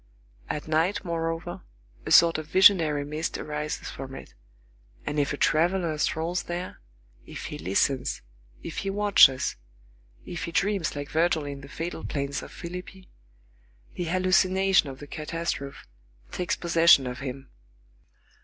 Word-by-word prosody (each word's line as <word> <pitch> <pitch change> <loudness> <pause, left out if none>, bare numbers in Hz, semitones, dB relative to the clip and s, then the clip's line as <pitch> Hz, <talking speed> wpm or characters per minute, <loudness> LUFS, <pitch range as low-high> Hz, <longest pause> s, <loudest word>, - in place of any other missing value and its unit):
At 150 - -4
night, 160 +6 +1
moreover, 165 0 -3 0.5
a - - -3
sort 165 -2 +6
of 155 - -7
visionary 160 -6 +5
mist 155 +2 -3
arises 150 0 -4
from 135 0 -8
it; - - -11 0.7
and 150 - -1
if 140 - +1
a 145 - -3
traveller 170 +1 +2
strolls 165 +4 0
there, 175 - -6 0.5
if - - -7
he - - -6
listens, 110 - 0 0.4
if - - -7
he 195 - -2
watches, 195 -10 +4 0.7
if 175 - -5
he 170 - -6
dreams 195 -3 0
like 145 0 -5
Virgil 160 -1 +1
in 140 -1 -6
the 140 - -12
fatal 165 +2 -5
plains 140 -1 -3
of - - -10
Philippi, 180 +2 -9 0.8
the 175 - -4
hallucination 185 0 +3
of 135 - -8
the 145 - -10
catastrophe 150 -2 -4 0.5
takes 180 - -1
possession 165 -5 +5
of 125 0 -5
him. 135 0 -7
165 Hz, 140 wpm, -26 LUFS, 145-175 Hz, 0.8 s, sort